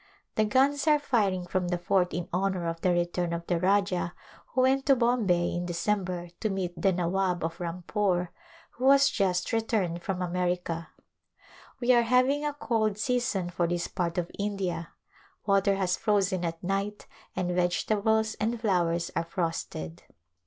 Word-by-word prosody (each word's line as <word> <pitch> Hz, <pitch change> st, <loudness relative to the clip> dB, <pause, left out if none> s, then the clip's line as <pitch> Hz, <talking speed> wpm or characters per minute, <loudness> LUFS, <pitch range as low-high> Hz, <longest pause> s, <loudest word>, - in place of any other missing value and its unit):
The 215 Hz, -, +2 dB
guns 275 Hz, +7 st, +2 dB
are 300 Hz, -1 st, +6 dB
firing 205 Hz, -10 st, 0 dB
from 180 Hz, 0 st, -1 dB
the 175 Hz, 0 st, 0 dB
fort 180 Hz, +1 st, +1 dB
in 175 Hz, +1 st, -3 dB
honor 185 Hz, -1 st, 0 dB
of 165 Hz, 0 st, -4 dB
the 185 Hz, -, +2 dB
return 175 Hz, 0 st, 0 dB
of 170 Hz, 0 st, -4 dB
the 175 Hz, -1 st, 0 dB
Rajah 185 Hz, -2 st, +1 dB, 0.3 s
who 255 Hz, -, 0 dB
went 265 Hz, +2 st, +2 dB
to 275 Hz, -, +6 dB
Bombay 230 Hz, -8 st, +2 dB
in 175 Hz, 0 st, -2 dB
Decem 190 Hz, +3 st, 0 dB
ber 175 Hz, -1 st, -5 dB
to 215 Hz, -, -1 dB
meet 190 Hz, -3 st, -2 dB
the 185 Hz, +3 st, +2 dB
Nawab 180 Hz, 0 st, 0 dB
of 165 Hz, +1 st, -3 dB
Rampore, 180 Hz, +1 st, -1 dB, 0.4 s
who 260 Hz, +2 st, +1 dB
has 275 Hz, 0 st, +6 dB
just 185 Hz, -1 st, 0 dB
re 225 Hz, -, +3 dB
turned 185 Hz, -7 st, -1 dB
from 185 Hz, 0 st, -2 dB
America. 175 Hz, -2 st, -2 dB, 0.9 s
We 250 Hz, 0 st, +4 dB
are 240 Hz, -, +6 dB
having 255 Hz, +5 st, +3 dB
a 295 Hz, -1 st, -1 dB
cold 220 Hz, -7 st, 0 dB
season 230 Hz, -6 st, 0 dB
for 175 Hz, -1 st, 0 dB
this 175 Hz, 0 st, -1 dB
part 175 Hz, -2 st, -2 dB
of 175 Hz, -1 st, -2 dB
India. 190 Hz, -5 st, -2 dB, 0.6 s
Water 200 Hz, -1 st, +3 dB
has 185 Hz, -2 st, 0 dB
frozen 195 Hz, -3 st, +1 dB
at 165 Hz, 0 st, -4 dB
night 195 Hz, +3 st, -2 dB, 0.3 s
and 180 Hz, -1 st, -1 dB
vegetables 215 Hz, +5 st, +1 dB
and 225 Hz, +2 st, -1 dB
flowers 175 Hz, -6 st, +1 dB
are -, -, +1 dB
frosted. 165 Hz, -, -4 dB
185 Hz, 165 wpm, -28 LUFS, 175-215 Hz, 0.9 s, are